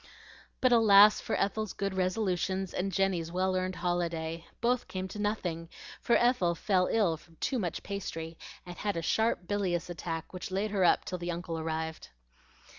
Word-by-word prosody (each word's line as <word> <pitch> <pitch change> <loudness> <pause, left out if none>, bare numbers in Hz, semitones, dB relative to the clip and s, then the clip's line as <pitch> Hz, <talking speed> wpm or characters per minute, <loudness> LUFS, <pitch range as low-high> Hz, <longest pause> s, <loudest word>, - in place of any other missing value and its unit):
But 255 - +4
alas 210 -3 +7
for - - -2
Ethel's 215 +1 -1
good 195 0 -2
resolutions 190 0 -1
and 195 +2 -1
Jenny's 185 -4 0
well 185 +1 0
earned 185 0 -1
holiday! 170 -2 -2
Both 240 +1 +1
came 185 0 -4
to 210 - -7
nothing, 175 -6 -2 0.3
for 235 - +3
Ethel 240 -9 +3
fell 185 0 +2
ill 195 -8 +2
from 165 +1 -21
too 255 - -1
much 175 -6 -3
pastry, 165 -5 -5 0.3
and 175 0 -9
had 205 -4 -2
a 165 - -2
sharp 220 -2 +1
bilious 185 -4 -1
attack 165 0 -5
which 185 - -6
laid 195 +3 -1
her 195 -3 +1
up 175 - +4
till 180 - -4
the 175 +1 -4
uncle 170 -1 -3
arrived. 160 0 -4
185 Hz, 175 wpm, -30 LUFS, 170-205 Hz, 0.3 s, alas